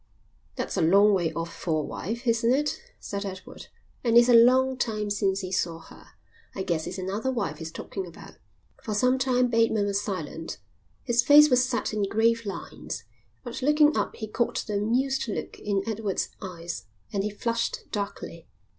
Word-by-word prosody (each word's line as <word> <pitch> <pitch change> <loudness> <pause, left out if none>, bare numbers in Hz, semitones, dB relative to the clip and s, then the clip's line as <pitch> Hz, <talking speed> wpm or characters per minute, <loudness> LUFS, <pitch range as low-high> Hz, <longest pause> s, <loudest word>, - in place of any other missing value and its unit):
"That's - - -3
a - - +2
long 200 +6 +5
way 175 -4 +1
off 165 0 -4
for 155 -3 -1
a - - -5
wife, 235 +7 -5
isn't 230 0 +2
it?" 295 - 0 0.2
said 200 0 -5
Edward. 190 -2 -8 0.4
"And 235 -1 +4
it's 240 +1 +7
a - - +6
long 255 +3 +6
time 215 -4 -2
since 195 -1 0
he 185 -1 -6
saw 170 -3 -1
her. 165 - -15 0.5
I 190 - -2
guess 165 -4 -1
it's - - -5
another 195 +7 -2
wife 240 -2 -3
he's 160 -1 -6
talking 190 +2 -6
about." 170 - -12 0.5
For 220 -5 -3
some 255 +4 +3
time 250 -1 +2
Bateman 225 -3 +2
was 200 0 0
silent. 165 -5 -5 0.5
His 240 -1 +3
face 295 +3 +7
was 250 0 +5
set 250 -3 -2
in 205 -2 0
grave 230 +1 +2
lines. 195 - -6 0.4
But 240 0 -6
looking 300 +2 +4
up - - -1
he 220 - -5
caught 235 +2 -1
the 210 -2 -2
amused 250 +6 0
look 210 - -5
in 200 -2 -1
Edward's 215 -3 -2
eyes, 170 - -6 0.3
and 195 -1 0
he 210 - -1
flushed 230 +2 -2
darkly. 200 -2 -5
215 Hz, 180 wpm, -26 LUFS, 195-245 Hz, 0.5 s, it's